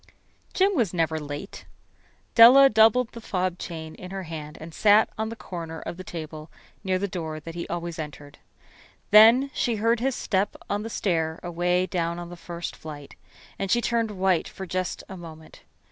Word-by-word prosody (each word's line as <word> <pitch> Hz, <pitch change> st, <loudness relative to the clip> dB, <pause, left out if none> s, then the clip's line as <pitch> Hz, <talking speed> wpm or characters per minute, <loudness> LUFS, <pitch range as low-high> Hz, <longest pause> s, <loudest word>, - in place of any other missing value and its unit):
Jim 390 Hz, +1 st, +3 dB
was 215 Hz, -, 0 dB
never 160 Hz, -1 st, 0 dB
late. 145 Hz, +5 st, -7 dB, 0.7 s
Della 260 Hz, +4 st, +9 dB
doubled 225 Hz, +2 st, +4 dB
the 230 Hz, -, -10 dB
fob 185 Hz, -4 st, -2 dB
chain 160 Hz, -2 st, -7 dB
in 185 Hz, -, -10 dB
her 195 Hz, 0 st, -5 dB
hand 155 Hz, -2 st, -8 dB
and 160 Hz, +1 st, -10 dB
sat 210 Hz, +3 st, +4 dB
on 220 Hz, 0 st, -3 dB
the 230 Hz, -, -6 dB
corner 165 Hz, -6 st, -7 dB
of -, -, -6 dB
the 185 Hz, -, -9 dB
table 155 Hz, -3 st, -8 dB, 0.3 s
near 190 Hz, -2 st, +1 dB
the 200 Hz, +2 st, -2 dB
door 160 Hz, -4 st, -5 dB
that 165 Hz, +2 st, -9 dB
he 170 Hz, 0 st, -5 dB
always 170 Hz, -1 st, -5 dB
entered. 145 Hz, -1 st, -8 dB, 0.7 s
Then 230 Hz, +6 st, +7 dB
she 235 Hz, -, 0 dB
heard 230 Hz, +2 st, +1 dB
his 260 Hz, +1 st, 0 dB
step 195 Hz, 0 st, -1 dB
on 205 Hz, 0 st, -1 dB
the 225 Hz, -, -5 dB
stair 165 Hz, -7 st, -1 dB
away 175 Hz, +1 st, 0 dB
down 170 Hz, -1 st, -2 dB
on 175 Hz, 0 st, -7 dB
the -, -, -7 dB
first 170 Hz, 0 st, -7 dB
flight, 145 Hz, -3 st, -10 dB, 0.5 s
and 195 Hz, -, -2 dB
she 240 Hz, -, +3 dB
turned 230 Hz, -1 st, 0 dB
white 190 Hz, -4 st, +1 dB
for 190 Hz, -, -8 dB
just 185 Hz, 0 st, -3 dB
a 190 Hz, -, -8 dB
moment. 160 Hz, -3 st, -12 dB
180 Hz, 185 wpm, -25 LUFS, 165-215 Hz, 0.7 s, Della